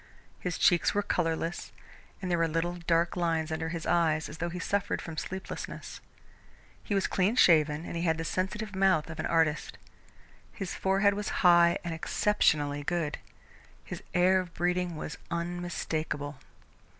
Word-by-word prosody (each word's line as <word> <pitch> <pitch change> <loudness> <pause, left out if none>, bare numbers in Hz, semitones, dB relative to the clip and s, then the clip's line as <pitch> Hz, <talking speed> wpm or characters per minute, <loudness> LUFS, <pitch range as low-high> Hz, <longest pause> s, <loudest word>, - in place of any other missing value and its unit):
His 180 -2 -3
cheeks 175 +3 +3
were 205 - +2
colourless, 165 -2 -1 0.5
and 180 - -2
there 170 - +2
were 165 - +3
little 165 +2 -1
dark 170 -1 +1
lines 165 -2 0
under 160 +1 -2
his 165 -1 -4
eyes 160 -3 +2
as 150 - -10
though 175 - -1
he 175 - -6
suffered 200 +2 -1
from 165 - -7
sleeplessness. 190 +4 -6 0.8
He 205 - -2
was 195 - +2
clean 195 +5 +1
shaven 155 -7 +4
and - - -6
he 170 - -2
had 160 -2 +1
the 165 - -4
sensitive 195 +4 -2
mouth 190 -5 +2
of 160 - -9
an - - -1
artist. 160 -2 +1 0.8
His 195 -4 -5
forehead 195 +1 +2
was 210 +1 -3 0.2
high 170 -1 +6
and 170 -2 -3
exceptionally 150 -5 +1
good. 165 -1 -2 0.7
His - - -7
air 185 +1 +5
of 180 -2 -6
breeding 180 0 0
was 155 0 -6
unmistakable. 165 -4 -3
170 Hz, 160 wpm, -29 LUFS, 160-180 Hz, 0.8 s, high